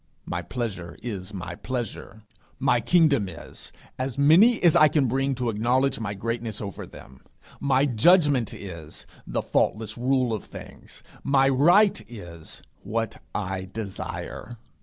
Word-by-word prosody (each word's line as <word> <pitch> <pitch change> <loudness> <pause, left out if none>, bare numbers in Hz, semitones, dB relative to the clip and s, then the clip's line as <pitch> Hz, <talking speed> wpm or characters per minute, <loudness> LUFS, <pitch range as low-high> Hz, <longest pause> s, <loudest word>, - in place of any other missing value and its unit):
My - - -3
pleasure 100 -9 -5
is 100 -5 -5
my 90 -3 -6
pleasure. 110 -1 -6 0.3
My 120 - +2
kingdom 140 - +3
is 85 - -10 0.3
as 130 0 -3
many 175 +12 +6
as 170 -3 +6
I 155 - +7
can 145 -2 +2
bring 135 +3 0
to 125 -2 -1
acknowledge 125 +5 +1
my 105 -2 -3
greatness 115 +1 -3
over 100 -2 -6
them. 65 -1 -14 0.4
My 135 0 +2
judgment 145 - +4
is 85 -6 -9 0.2
the - - -2
faultless 110 +2 0
rule 130 -1 +1
of 105 - -3
things. - - -12 0.2
My 135 -1 +3
right 175 +10 +4
is 85 -8 -9 0.2
what 115 +2 -3
I 95 -2 -3
desire. 110 +2 -6
120 Hz, 140 wpm, -25 LUFS, 100-135 Hz, 0.4 s, I